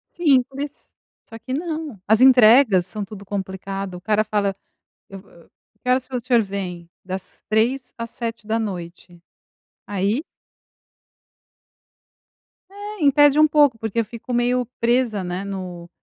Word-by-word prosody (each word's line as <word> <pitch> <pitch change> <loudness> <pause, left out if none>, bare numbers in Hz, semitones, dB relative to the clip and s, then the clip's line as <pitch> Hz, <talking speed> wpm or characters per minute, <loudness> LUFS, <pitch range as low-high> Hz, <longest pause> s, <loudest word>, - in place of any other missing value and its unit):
Simples, 280 -2 0 0.4
só 225 - -10
que 255 +3 -6
não, 310 - -4
as 220 +3 +4
entregas 240 -6 +6
são 205 +1 -5
tudo 200 0 -11
complicada, 195 -1 -5
o - - -13
cara 215 +1 +1
fala: 200 -2 -1 0.5
"Eu 195 0 -9
vou, 195 - -21
eh", 170 - -19 0.4
"Que 250 - -3
horas 255 0 +2
o 250 - -1
senhor 240 -3 +4
vem?". 185 -4 -6 0.2
"Das 185 0 -7
15h 250 +4 0
às 230 0 -5
19h. 210 -7 -5 0.7
Aí 205 - -1 2.5
É, 410 -1 -8
impede 290 +1 +5
um 310 - +7
pouco, 290 -6 +4
porque 225 +1 -2
eu 225 - +1
fico 235 +2 -9
meio 245 +1 +1
presa, 235 -4 +1
né, 180 +2 -4
no 180 -3 -7
220 Hz, 135 wpm, -22 LUFS, 195-255 Hz, 2.5 s, um